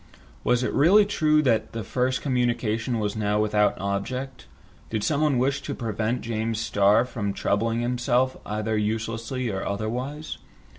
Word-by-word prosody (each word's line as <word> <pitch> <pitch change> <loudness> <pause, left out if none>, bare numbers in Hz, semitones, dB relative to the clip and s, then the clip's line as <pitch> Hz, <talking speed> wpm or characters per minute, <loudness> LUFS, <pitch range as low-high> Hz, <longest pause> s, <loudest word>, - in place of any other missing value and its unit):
Was 125 0 +2
it - - -1
really 190 +9 +6
true 155 -6 +2
that 115 -5 +1
the 115 -1 -4
first 130 +5 -1
communication 120 -3 0
was 105 -1 -2
now 105 -1 0
without 105 -1 +2
object? 125 +7 -4 0.4
Did 110 -2 -2
someone 150 -2 +2
wish 135 +3 +1
to - - -5
prevent 110 +1 -2
James 110 -1 -2
Starr 105 +1 +3
from 105 -5 -3
troubling 115 +4 0
himself 125 +1 +1
either 110 +1 -2
uselessly 115 +3 -2
or 95 -1 -3
otherwise? 125 +9 -4
115 Hz, 145 wpm, -25 LUFS, 110-130 Hz, 0.4 s, really